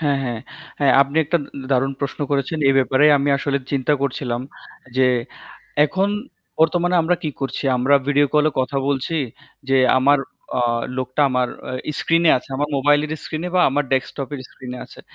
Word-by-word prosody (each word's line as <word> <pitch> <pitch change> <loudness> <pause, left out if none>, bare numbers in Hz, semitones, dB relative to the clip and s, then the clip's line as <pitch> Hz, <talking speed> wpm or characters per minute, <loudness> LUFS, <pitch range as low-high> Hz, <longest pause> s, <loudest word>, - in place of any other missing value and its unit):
হ্যাঁ, 145 -3 +1
হ্যাঁ। 120 -3 -3 0.4
হ্যাঁ 140 -2 +4
আপনি 140 +2 -7
একটা 160 +4 +1
উন 140 - -8 0.2
দারুণ 135 +1 +2
প্রশ্ন 140 0 -4
করেছেন। 140 +3 -1
এ - - +6
ব্যাপারে 135 +2 +3
আমি 140 +1 0
আসলে 140 0 -1
চিন্তা 140 +1 +1
করছিলাম 125 -3 -2 0.6
যে 130 0 +4 0.8
এখন 190 +5 0 0.5
বর্তমানে 175 +2 +2
আমরা 175 +2 +1
কি 155 - -2
করছি? 135 +1 -3
আমরা 130 +3 +3
ভিডিও 145 0 +3
কল 150 0 +4
এ - - -19
কথা 135 +2 -2
বলছি 140 +4 -1 0.5
যে 135 - +3 0.2
আমার 140 +2 +4 0.4
আ - - +1 0.4
লোকটা 130 +2 -3
আমার 125 -1 +1 0.2
অ্যা 130 +4 -5
স্ক্রিনে 165 0 +3
আছে। 125 - -7
আমার 145 +2 -1
মোবাইলের 145 +2 +2
স্ক্রিনে 160 +3 -4
বা 180 - +4
আমার 145 +2 0
ডেস্কটপ 135 0 -1
এর 140 - -5
স্ক্রিনে 125 -1 -9
আছে। - - -14
140 Hz, 175 wpm, -21 LUFS, 130-150 Hz, 0.8 s, এ